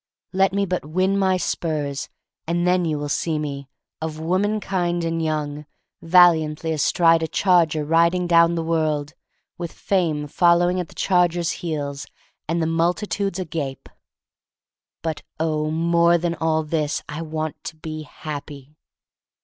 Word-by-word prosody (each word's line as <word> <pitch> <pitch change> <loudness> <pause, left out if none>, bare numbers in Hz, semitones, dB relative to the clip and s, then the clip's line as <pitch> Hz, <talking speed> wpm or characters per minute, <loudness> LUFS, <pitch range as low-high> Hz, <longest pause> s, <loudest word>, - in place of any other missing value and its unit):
Let 190 0 +3
me 200 +1 0
but 180 -1 -2
win 185 +6 0
my 190 -1 +2
spurs, 150 -6 -2 0.4
and 170 +1 0
then 180 0 +2
you 155 -2 -1
will 145 0 -3
see 155 +2 -1
me 140 -2 -5 0.2
— - - -66
of 155 -1 -4
womankind 185 0 0
and 165 0 -1
young 150 -1 -3 0.2
— - - -59
valiantly 165 -2 +4
astride 165 +2 +3
a 160 - -1
charger 165 -5 +2
riding 170 +3 +3
down 170 0 +4
the 165 - -1
world, 155 -2 -1 0.5
with 170 -2 -4
Fame 165 -6 0
following 175 +3 +3
at 180 - -3
the - - -16
charger's 175 -2 +2
heels, 145 -4 -4 0.4
and 165 +2 0
the 160 - +1
multitudes 175 +4 0
agape. 155 -7 -4 1.2
But 160 -2 -3 0.2
oh, 155 -1 0
more 170 +2 +3
than 170 0 -1
all 160 -1 0
this 155 -1 -1
I 150 +2 -5
want 155 -1 -4
to 160 - -5
be 155 0 -6
happy! 150 -1 -8
165 Hz, 150 wpm, -22 LUFS, 155-175 Hz, 1.2 s, valiantly